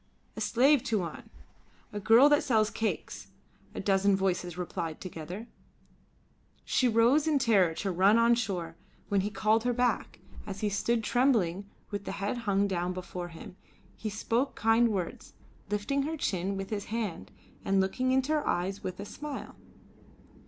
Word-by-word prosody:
"A -, -, -6 dB
slave, 265 Hz, +3 st, +4 dB
Tuan! 195 Hz, -7 st, -3 dB, 0.6 s
A 205 Hz, -, -3 dB
girl 225 Hz, +6 st, +6 dB
that 295 Hz, 0 st, +4 dB
sells 220 Hz, -6 st, +2 dB
cakes," 225 Hz, -, -3 dB, 0.5 s
a -, -, -4 dB
dozen 195 Hz, 0 st, +3 dB
voices 180 Hz, -2 st, -1 dB
replied 170 Hz, -3 st, -4 dB
together. 180 Hz, +4 st, -7 dB, 1.2 s
She 255 Hz, -, +2 dB
rose 240 Hz, +7 st, +4 dB
in 305 Hz, -2 st, +3 dB
terror 200 Hz, -10 st, +3 dB
to 195 Hz, -, -2 dB
run 190 Hz, +5 st, +4 dB
on 230 Hz, +1 st, +5 dB
shore, 185 Hz, -8 st, -2 dB, 0.3 s
when 200 Hz, -1 st, +2 dB
he 205 Hz, -, -2 dB
called 215 Hz, +1 st, +1 dB
her 245 Hz, 0 st, +1 dB
back; 245 Hz, +1 st, 0 dB, 0.2 s
and -, -, -11 dB
as 195 Hz, -, -5 dB
she 210 Hz, -, +1 dB
stood 225 Hz, +3 st, 0 dB
trembling 205 Hz, -7 st, +1 dB, 0.2 s
with 205 Hz, -1 st, -5 dB
head 200 Hz, +4 st, -2 dB
hung 200 Hz, +1 st, +3 dB
down 180 Hz, -1 st, -1 dB
before 180 Hz, -1 st, -6 dB
him, 170 Hz, +2 st, -11 dB, 0.4 s
he 220 Hz, -, -4 dB
spoke 230 Hz, +5 st, -1 dB
kind 225 Hz, +2 st, +3 dB
words, 190 Hz, -5 st, -4 dB, 0.4 s
lifting 210 Hz, +7 st, 0 dB
her 315 Hz, +3 st, -3 dB
chin 195 Hz, -, -1 dB
with 195 Hz, +1 st, -6 dB
his 205 Hz, -2 st, -3 dB
hand 220 Hz, -5 st, -4 dB, 0.3 s
and 195 Hz, 0 st, +2 dB
looking 255 Hz, +7 st, 0 dB
into 265 Hz, +3 st, +1 dB
her 300 Hz, -1 st, 0 dB
eyes 190 Hz, +3 st, -1 dB
with 185 Hz, 0 st, -5 dB
a 200 Hz, -, -5 dB
smile. 295 Hz, +6 st, -7 dB
205 Hz, 160 wpm, -29 LUFS, 190-235 Hz, 1.2 s, girl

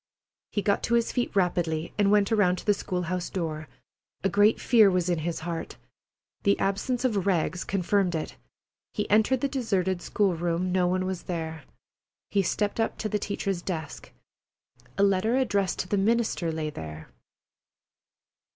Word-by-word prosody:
He 205 Hz, -, -1 dB
got 200 Hz, +1 st, +2 dB
to 235 Hz, -, +2 dB
his 235 Hz, -1 st, +1 dB
feet 245 Hz, -4 st, -2 dB
rapidly 170 Hz, -4 st, 0 dB
and 205 Hz, -1 st, +3 dB
went 205 Hz, 0 st, +3 dB
around 200 Hz, -5 st, +3 dB
to -, -, -9 dB
the 210 Hz, -, +4 dB
school 180 Hz, -2 st, -3 dB
house 180 Hz, 0 st, -3 dB
door. 155 Hz, -4 st, -4 dB, 0.6 s
A 195 Hz, -, +2 dB
great 205 Hz, +4 st, +4 dB
fear 220 Hz, -4 st, +5 dB
was 180 Hz, -1 st, 0 dB
in 170 Hz, -, 0 dB
his 165 Hz, +1 st, -3 dB
heart. 165 Hz, 0 st, -5 dB, 0.6 s
The 100 Hz, -, +3 dB
absence 235 Hz, +6 st, -1 dB
of 200 Hz, -6 st, 0 dB
Rags 175 Hz, -2 st, +1 dB
confirmed 195 Hz, -1 st, +1 dB
it. 155 Hz, -, -4 dB, 0.6 s
He 210 Hz, -, -1 dB
entered 220 Hz, +5 st, +3 dB
the 280 Hz, -, +2 dB
deserted 195 Hz, -9 st, -1 dB
school 195 Hz, -2 st, +1 dB
room. 175 Hz, +2 st, -1 dB
No 180 Hz, -1 st, +2 dB
one 185 Hz, +1 st, 0 dB
was 185 Hz, -1 st, -3 dB
there. 160 Hz, -4 st, -4 dB, 0.7 s
He 200 Hz, -, +3 dB
stepped 205 Hz, +3 st, -1 dB
up 225 Hz, -, 0 dB
to 215 Hz, -, -3 dB
the 210 Hz, -, 0 dB
teacher's 195 Hz, -3 st, -2 dB
desk. 160 Hz, -5 st, -5 dB, 0.9 s
A 200 Hz, -, +3 dB
letter 200 Hz, +5 st, +2 dB
addressed 205 Hz, -7 st, +1 dB
to -, -, -7 dB
the 205 Hz, -, 0 dB
minister 215 Hz, -5 st, +1 dB
lay 155 Hz, -1 st, -3 dB
there. 80 Hz, -, -8 dB
190 Hz, 170 wpm, -27 LUFS, 170-205 Hz, 0.9 s, fear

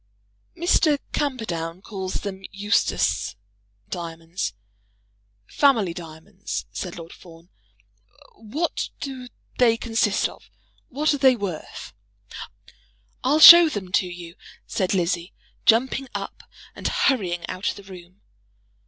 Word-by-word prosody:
"Mr. 330 Hz, -3 st, +3 dB, 0.2 s
Camperdown 185 Hz, -, -3 dB
calls 190 Hz, -3 st, -5 dB
them 195 Hz, -2 st, -6 dB
Eustace 195 Hz, -, 0 dB, 0.5 s
diamonds, 165 Hz, -, -5 dB, 0.9 s
family 225 Hz, -, +2 dB
diamonds," 170 Hz, +4 st, -7 dB
said 180 Hz, -2 st, -6 dB
Lord 165 Hz, 0 st, -10 dB
Fawn. 165 Hz, 0 st, -16 dB, 0.8 s
"What 275 Hz, +10 st, -3 dB
do 260 Hz, -3 st, -6 dB, 0.3 s
they 230 Hz, -2 st, +4 dB
consist 225 Hz, -3 st, +1 dB
of? -, -, -16 dB, 0.4 s
What 295 Hz, +4 st, +1 dB
are 285 Hz, -, -2 dB
they 260 Hz, -2 st, +5 dB
worth?" 195 Hz, -8 st, -6 dB, 1.3 s
"I'll 280 Hz, +5 st, +3 dB
show 340 Hz, +1 st, +11 dB
them 195 Hz, -9 st, -6 dB
to 185 Hz, -1 st, +2 dB
you," 175 Hz, -1 st, -9 dB, 0.3 s
said 190 Hz, 0 st, -1 dB
Lizzie, 175 Hz, 0 st, -1 dB, 0.3 s
jumping 260 Hz, +4 st, +3 dB
up -, -, -7 dB, 0.2 s
and -, -, -4 dB
hurrying 205 Hz, -, 0 dB
out 185 Hz, +2 st, -3 dB
of -, -, -4 dB
the 200 Hz, -, -12 dB
room. 185 Hz, 0 st, -14 dB
200 Hz, 110 wpm, -23 LUFS, 175-255 Hz, 1.3 s, show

